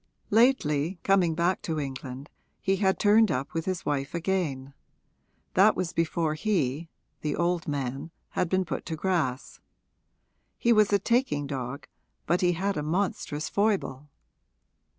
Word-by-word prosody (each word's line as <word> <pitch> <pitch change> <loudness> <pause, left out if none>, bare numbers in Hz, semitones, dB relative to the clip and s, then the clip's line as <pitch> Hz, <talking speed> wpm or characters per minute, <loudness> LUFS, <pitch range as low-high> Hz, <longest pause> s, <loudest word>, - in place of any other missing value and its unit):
Lately, 190 - +3
coming 185 -4 +3
back 175 +2 +1
to 160 -2 -2
England, 135 -1 -6 0.3
he 195 0 +1
had 190 -1 +2
turned 215 +1 +5
up 135 +6 -2
with 165 0 -2
his 185 -2 -3
wife 145 +2 -2
again; 160 -7 -2 0.8
that 200 +3 +5
was 180 -2 -2
before 165 -1 0
he 160 - -1 0.3
the 150 -1 -1
old 175 -1 0
man 140 0 -3 0.2
had 180 - -1
been 185 0 +1
put - - -4
to 160 - -2
grass. 155 -7 -1 1.0
He 235 - +3
was 215 -2 +4
a 200 - +5
taking 200 - +1
dog, 135 0 -5 0.4
but 175 +1 +1
he 175 -1 +3
had 195 +3 -1
a - - 0
monstrous 155 -2 -2
foible. 185 -10 0
165 Hz, 145 wpm, -27 LUFS, 145-190 Hz, 1.0 s, turned